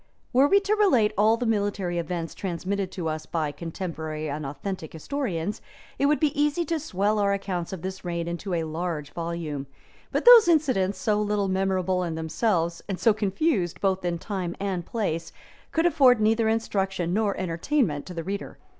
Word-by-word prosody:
Were 265 +3 +6
we 400 +6 +5
to 400 +1 +1
relate 265 - +3
all 215 +3 +4
the 245 - -2
military 200 -5 0
events 170 0 -3
transmitted 190 +1 -3
to 175 -3 -3
us 155 0 -4
by 155 -3 -1
contemporary 160 -1 -5
and 145 0 -4
authentic 160 +3 -5
historians, 195 - -3 0.4
it 280 - +3
would 300 +1 +3
be 305 -3 +2
easy 295 +3 +1
to 325 +1 -1
swell 210 -6 0
our 200 -1 +2
accounts 185 -3 -3
of 190 -4 -6
this 190 0 -5
reign 170 -1 -3
into 175 +2 -3
a 165 - 0
large 160 -2 -4
volume; 165 -5 -4 0.4
but - - -1
those 480 -4 +10
incidents, 260 - +2
so 210 -1 +1
little 205 -2 0
memorable 190 -1 +1
in 170 -3 -2
themselves, 170 +1 0
and 190 - -2
so 225 - +4
confused 205 - 0
both 190 -1 0
in 175 -1 -1
time 180 -1 -4
and 190 -3 -3
place, 165 -8 -2 0.4
could 325 +1 +1
afford 270 -8 +5
neither 220 +1 +3
instruction 195 -5 -1
nor 205 -1 +1
entertainment 175 - 0
to 180 - -8
the 165 - -3
reader. 200 +3 -5
190 Hz, 180 wpm, -26 LUFS, 170-220 Hz, 0.4 s, those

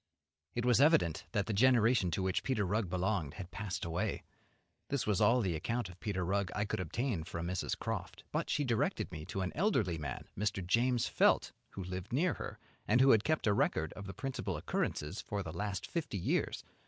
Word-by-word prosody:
It 120 0 -1
was 125 +1 +5
evident 95 - +4
that 100 -1 +1
the 110 - -2
generation 115 -3 +4
to 85 +3 -1
which 95 -1 +1
Peter 110 -7 0
Rugg 100 0 0
belonged 90 -4 -1
had 90 -3 -7
passed 95 -4 -4
away. 85 +2 -2 0.6
This 140 -3 -1
was 105 -3 +1
all 125 +1 +5
the 90 -6 0
account 115 +6 -2
of 90 0 -13
Peter 95 -5 -2
Rugg 100 0 0
I 105 - +1
could 100 - -2
obtain 105 -1 -1
from 85 0 -5
Mrs. 90 +1 -2
Croft; - - -4
but - - -1
she 145 - +1
directed 120 -5 0
me 75 0 -6
to 95 - -3
an 90 -1 -1
elderly 110 - +1
man, 75 - -5
Mr. 100 -2 -1
James 120 +5 +2
Felt, - - +3 0.2
who 95 - -5
lived 90 +2 -5
near 160 +7 +2
her, - - -6 0.3
and 115 +4 +4
who 135 +1 +7
had 110 -1 +5
kept 155 -3 +1
a 105 - +4
record 80 -5 +1
of 100 0 -8
the 100 - -6
principal 135 -2 -3
occurrences 75 +7 -2
for 100 -1 -3
the 80 -3 -6
last 100 +2 -3
fifty 165 - -3
years. 85 - 0
100 Hz, 205 wpm, -34 LUFS, 90-120 Hz, 0.6 s, who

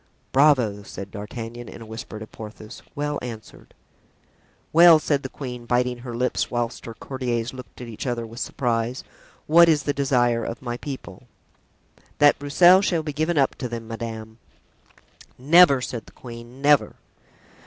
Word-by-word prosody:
("Bravo," 130 -8 +3
said 100 -1 -9
D'Artagnan 115 +3 -7
in - - -10
a 115 - -10
whisper 110 0 -8
to 110 - -7
Porthos; 110 +1 -11
"well 145 0 -2
answered.") 115 -3 -10 1.0
"Well," 170 0 +8
said 145 -2 0
the 135 - -6
queen, 125 -4 -8
biting 125 0 0
her 120 -1 -7
lips, 125 +2 -1
whilst 120 -1 -3
her 115 - -7
courtiers 125 -3 -3
looked 130 -1 -11
at 125 - -7
each 115 +3 -6
other 120 -2 -2
with 115 +2 -10
surprise, 120 -1 -2 0.4
"what 170 +2 +6
is 155 -2 +3
the 145 - 0
desire 120 -4 +1
of 115 - -5
my 120 -2 -5
people?" 135 0 -8 0.9
"That 145 0 +5
Broussel 175 +6 +6
shall 170 -5 0
be 150 -1 -4
given 155 +3 -1
up 135 -2 +3
to 125 - -4
them, 115 -1 -6
madame." 110 -1 -7 1.0
"Never!" 145 0 +6
said 120 -2 -5
the - - -16
queen, 120 +2 -11
"never!" 145 -1 +4
125 Hz, 160 wpm, -23 LUFS, 115-145 Hz, 1.0 s, Well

